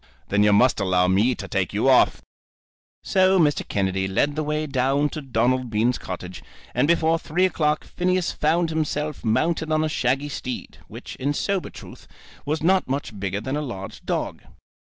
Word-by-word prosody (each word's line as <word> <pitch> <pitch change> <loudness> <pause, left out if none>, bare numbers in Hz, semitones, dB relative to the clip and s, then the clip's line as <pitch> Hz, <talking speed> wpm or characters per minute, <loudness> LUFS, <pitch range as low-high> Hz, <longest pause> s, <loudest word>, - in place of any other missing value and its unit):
"Then 105 +1 +2
you 105 0 +5
must 115 +5 +4
allow 90 -2 +2
me 105 +7 +3
to 100 - -7
take 95 -2 -1
you 105 +6 +1
off." 130 -2 +4 0.8
So 190 -1 +3
Mr. 150 -4 +2
Kennedy 95 -1 -1
led 140 +10 0
the 155 - -1
way 150 0 -1
down 140 +1 +1
to 155 - -6
Donald 130 -1 0
Bean's 115 +3 +1
cottage, 90 0 -7 0.3
and - - +2
before 165 0 +2
three 175 +5 +1
o'clock 150 -4 0
Phineas 180 0 0
found 165 +2 +1
himself 150 -2 -2
mounted 155 +8 0
on 155 0 +2
a 155 - 0
shaggy 135 0 0
steed, 130 -3 -6
which, - - -9
in 145 +3 -1
sober 195 +2 -1
truth, - - -13 0.4
was 155 +1 -1
not 185 -1 +2
much 130 -6 -3
bigger 100 +1 -2
than 130 +5 -3
a 150 - -1
large 100 -9 -7
dog. - - -3
140 Hz, 175 wpm, -23 LUFS, 105-155 Hz, 0.8 s, you